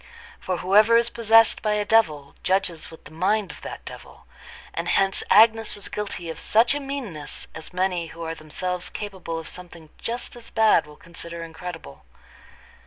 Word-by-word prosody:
For 185 -1 -2
whoever 210 +6 +5
is 235 0 +2
possessed 225 -1 +5
by 215 -1 +1
a 210 0 0
devil, 155 -12 +2
judges 185 -4 0
with 160 - -14
the - - -13
mind 190 +3 0
of - - -12
that - - -8
devil; - - -11 0.5
and 170 +1 -3
hence 195 +2 +2
Agnes 225 +2 +5
was 205 - -5
guilty 205 -4 -4
of - - -8
such 230 +4 +3
a 290 - -2
meanness 265 - -5
as 160 - -9
many 180 -2 -1
who 165 +1 -9
are 165 0 -3
themselves 175 +3 -4
capable 190 -5 -5
of 165 - -6
something 170 -3 -10
just 240 +1 -3
as 240 -1 -12
bad 215 -8 +4
will 150 0 -14
consider 170 0 -6
incredible. 165 - -9
185 Hz, 175 wpm, -24 LUFS, 165-220 Hz, 0.5 s, whoever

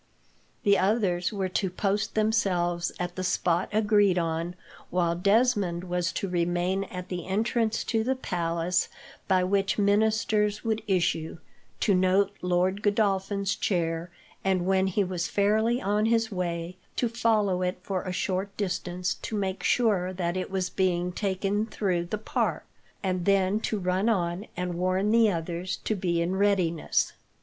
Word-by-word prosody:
The 200 -2 +4
others 190 -3 +1
were 195 -3 -1
to 185 +1 -1
post 200 +3 -1
themselves 180 -6 +1
at 180 0 -3
the 185 - -3
spot 180 -1 +1
agreed 205 -3 +3
on, 165 +1 -1 0.3
while 170 -1 +1
Desmond 200 -2 +2
was 180 0 -1
to 195 - -2
remain 175 +2 0
at 180 -1 -8
the 175 -2 -4
entrance 225 +3 0
to 225 -2 0
the 260 +3 0
palace 175 -5 -1 0.4
by 185 -1 +3
which 195 +1 +1
ministers 210 0 +2
would 220 -1 0
issue, 170 -4 0 0.4
to 205 - +3
note 185 +2 +3
Lord 180 +2 +1
Godolphin's 200 -1 +1
chair, 170 -3 -1 0.3
and, 185 -2 +1
when 190 0 +2
he 195 +2 +1
was 180 -2 -2
fairly 220 +4 +2
on 210 +1 +1
his 225 -1 +2
way, 175 -1 -3 0.2
to 245 - +1
follow 220 -5 +1
it 180 0 -1
for 190 -3 -2
a 185 - -4
short 190 +2 -2
distance 180 -2 -2
to 220 - -4
make 195 -2 -2
sure 200 -6 +2
that 175 -1 -2
it 185 - -3
was 190 -1 -2
being 180 -2 0
taken 200 +2 -1
through 185 -6 -1
the 195 +5 -3
park, 215 - -1 0.4
and 185 -2 -1
then 195 +1 +3
to 220 - -2
run 185 +3 +1
on 180 -1 -1
and 180 0 -2
warn 185 +4 +1
the 230 -1 +5
others 175 +1 -3
to - - 0
be 175 -4 0
in 180 +3 -1
readiness. 190 -5 +1
190 Hz, 155 wpm, -27 LUFS, 180-205 Hz, 0.4 s, the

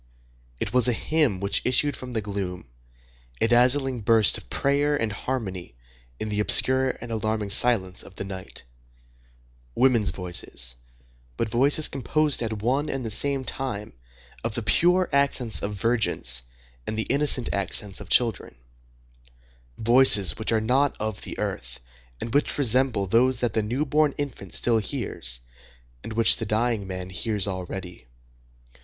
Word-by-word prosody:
It - - -4
was 125 -1 +4
a 125 - +2
hymn 145 -6 0
which 100 +1 0
issued 130 +3 +1
from 125 -1 -9
the 110 -2 -2
gloom, 95 -3 -5 0.7
a 115 - +2
dazzling 125 +2 +3
burst 110 -1 +4
of - - -8
prayer 145 +1 0
and 110 -2 -2
harmony 100 - -5 0.4
in 110 - -4
the 105 0 -2
obscure 130 +4 +5
and 120 - -9
alarming 110 -2 -2
silence 100 -5 +2
of 95 - -13
the - - -6
night; 95 -1 -9 1.1
women's 125 -5 +2
voices, 90 -9 -3 0.6
but 115 - -2
voices 140 +7 +3
composed 150 +2 0
at 110 -3 -4
one 135 +6 0
and 135 -3 -4
the 110 - -3
same 140 +4 +4
time 105 -7 -4 0.5
of 115 -1 -4
the 120 - -3
pure 175 - +2
accents 140 -5 +1
of 105 +1 -4
virgins 100 - +1 0.5
and 110 - -4
the 110 - -1
innocent 140 -3 +2
accents 100 +1 -3
of 100 - -11
children,—voices - - 0
which 110 - -1
are 110 - +2
not 130 +5 +1
of 110 -1 -4
the - - -8
earth, - - -5 0.4
and 115 - -6
which 145 - 0
resemble 130 -5 +3
those 120 +5 +2
that 120 - -1
the 110 - +1
newborn 145 +6 0
infant 130 -10 -6
still 115 -2 +2
hears, - - -5 0.6
and 110 - -7
which 115 +1 +5
the 115 - -4
dying 110 -1 -1
man 95 -1 -7
hears 105 0 -1
already. 90 -4 -7
110 Hz, 150 wpm, -24 LUFS, 95-130 Hz, 1.1 s, obscure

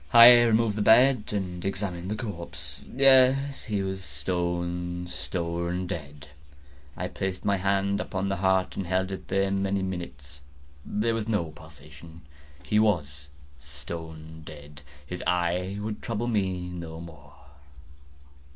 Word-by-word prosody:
I 115 0 +11 0.2
removed 115 -2 +2
the - - 0
bed 120 +2 +6
and 90 -4 -3
examined 95 -2 -3
the 105 - -1
corpse. 100 -7 -7
Yes, 135 +1 +5
he 105 -4 -1
was 95 0 -4
stone, 90 -1 -3
stone 85 +4 -3
dead. 75 -6 -7 0.7
I - - -2
placed 95 -1 -4
my 100 -1 +2
hand 100 +1 +1
upon 95 +1 -3
the 95 -1 -1
heart 95 0 +1
and 95 - -4
held 95 +1 0
it 95 - -7
there 95 0 +1
many 95 0 0
minutes. 75 -6 -6 0.4
There 110 +7 0
was 115 -1 -2
no 90 -8 0
pulsation. 75 +1 -14 0.4
He 105 - +2
was 75 -10 0 0.3
stone 80 +3 -8
dead. 75 -1 -11 0.2
His 90 +5 -6
eye 90 +2 0
would 105 0 -4
trouble 115 -1 -2
me 95 -6 -1
no 85 -2 -7
more. 80 -4 -12
90 Hz, 135 wpm, -27 LUFS, 85-100 Hz, 0.7 s, I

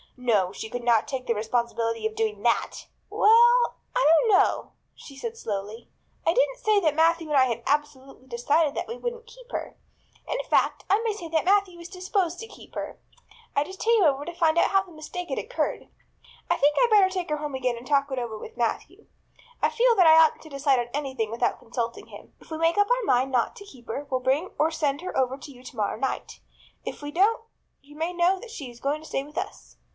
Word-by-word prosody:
No, 215 -7 +1
she 220 +2 -7
could 245 +1 -5
not 235 -2 +3
take 260 -2 -4
the 235 - +1
responsibility 230 0 -1
of 220 0 -2
doing 215 -2 -1
that! 235 -1 0 0.2
"Well, 475 +3 +5 0.2
I - - +3
don't 465 - +1
know," 400 -1 +2 0.2
she 275 - -13
said 455 +12 -5
slowly. 210 - -5 0.4
"I - - +5
didn't - - +2
say 430 -4 +3
that 310 -6 +1
Matthew 330 0 +2
and 295 - +2
I 260 - +6
had 235 -2 -3
absolutely 275 -2 -2
decided 285 +5 +1
that - - -3
we 470 - -6
wouldn't 475 -1 -5
keep - - -16
her. - - -5 0.5
In - - -2
fact - - +1
I 410 +3 +4
may 450 -2 0
say 400 -5 -7
that 320 0 0
Matthew 385 -2 +2
is 340 - -9
disposed 365 -1 -2
to 450 - -7
keep - - -15
her. - - -5 0.6
I 285 - +3
just 375 +5 -11
came 455 -2 +3
over 285 -2 +2
to 345 - -6
find 335 -1 +2
out - - +3
how 390 0 +4
the 375 - -17
mistake 345 +3 -7
had - - -2
occurred. - - -3 0.6
I - - +3
think 290 +1 +3
I'd 485 -2 +3
better 400 -3 +6
take 365 -3 -4
her 300 - +1
home 295 -2 -5
again 250 -2 -1
and 235 - -10
talk 280 -1 +2
it 265 - -1
over 235 -3 -4
with 215 - -11
Matthew. 235 -2 -3 0.5
I - - +3
feel 480 0 +3
that 365 -5 +5
I 320 0 +8
oughtn't 315 - +1
to 315 - -12
decide 275 -2 +1
on 240 0 -3
anything 265 -6 -2
without 235 +1 -1
consulting 235 0 -4
him. - - -13
If - - -19
we 315 - -3
make 330 +3 +2
up 410 0 +3
our - - +2
mind 260 -2 +2
not 245 -2 +1
to 405 - -11
keep 255 - -16
her 275 +6 -4
we'll 255 - 0
bring 270 +8 0
or 315 - +4
send 295 -2 -1
her 370 - -6
over 260 0 +1
to 285 - -11
you 250 -2 -15
tomorrow 220 -5 -3
night. 265 - -4 0.4
If - - -6
we 290 0 -6
don't 405 +8 +2 0.4
you 290 +1 -17
may 325 +3 -2
know 355 +2 +2
that 460 +3 -11
she 285 - -7
is 240 0 -14
going 290 +4 -1
to 315 - -12
stay 270 - -2
with 300 +2 -14
us. 385 +3 -6
295 Hz, 230 wpm, -26 LUFS, 250-380 Hz, 0.6 s, I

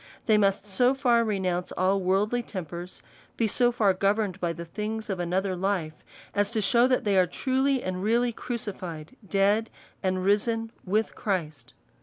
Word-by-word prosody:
They 220 - +4
must 195 0 +1
so 245 +6 +2
far 240 -4 +3
renounce 185 -5 -1
all 190 +2 +1
worldly 200 +6 +1
tempers, 180 -4 -7 0.3
be 230 - +2
so 240 +3 +3
far 215 -5 +3
govern 200 +2 +1
ed 185 - -16
by 175 -2 0
the 170 0 -7
things 215 +4 -4
of 190 - -3
another 185 +2 -1
life, 180 -4 -1 0.4
as 205 -1 +1
to 225 - +1
shew, 235 +5 +4
that 255 -1 +1
they 200 -2 +2
are 180 - +4
truly 265 +6 0
and 185 0 -3
really 235 +4 +2
crucified, 190 -8 -6
dead, 205 +3 +2 0.3
and 185 -1 0
risen 225 +3 +1
with 215 +4 0
Christ. 155 - -3
200 Hz, 170 wpm, -27 LUFS, 185-225 Hz, 0.4 s, They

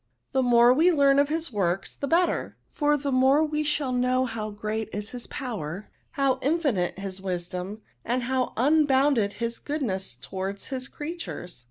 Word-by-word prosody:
The 265 - +2
more 240 -1 +6
we 330 +7 +4
learn 280 -3 +4
of 285 0 +3
his 320 -3 -1
works, 190 -2 0
the 280 - -4
better; 345 +4 +1 0.2
for 295 -1 +2
the 280 0 -2
more 265 +4 +4
we 305 0 -1
shall 295 -3 0
know 255 +1 +2
how 220 -3 -4
great 215 +1 -3
is 210 +1 -4
his 245 -1 -7
power, 210 - -5 0.2
how 275 -2 +1
infinite 275 - 0
his 195 -1 -5
wisdom, 185 +2 -4 0.2
and 245 +2 -1
how 255 0 0
imbounded 270 -5 +3
his 230 0 -3
goodness 210 - -3
towards 190 +10 -5
his 265 0 -4
creatures.' 295 - -7
250 Hz, 165 wpm, -26 LUFS, 205-285 Hz, 0.2 s, more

